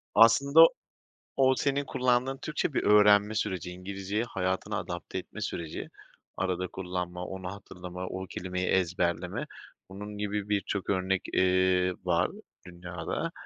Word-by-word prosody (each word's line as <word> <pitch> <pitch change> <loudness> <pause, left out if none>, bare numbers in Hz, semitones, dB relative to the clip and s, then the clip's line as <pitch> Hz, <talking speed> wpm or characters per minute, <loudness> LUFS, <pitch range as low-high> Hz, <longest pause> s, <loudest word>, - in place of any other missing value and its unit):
Aslında 140 +9 +8 0.7
o 130 -1 +5
senin 140 +1 0
kullandığın 130 0 +1
Türkçe, 155 0 -1
bir - - 0
öğrenme 105 0 +6
süreci, 95 -4 -2
İngilizceyi 100 +4 -3
hayatına 95 -5 -2
adapte 85 +1 -5
etme 100 +3 -8
süreci. 85 -6 -4 0.5
Arada 90 -1 -1
kullanma, 90 -1 -4
onu 95 0 -6
hatırlama, 90 -2 -8
o 95 +1 -5
kelimeyi 90 0 -3
ezberleme, 90 -1 0 0.4
bunun 105 +2 -8
gibi 105 0 -2
birçok 100 -1 -1
örnek, 95 -1 +1
eee, 90 0 +3
var 90 0 +2 0.4
dünyada. 90 - -5
95 Hz, 120 wpm, -29 LUFS, 90-105 Hz, 0.7 s, Aslında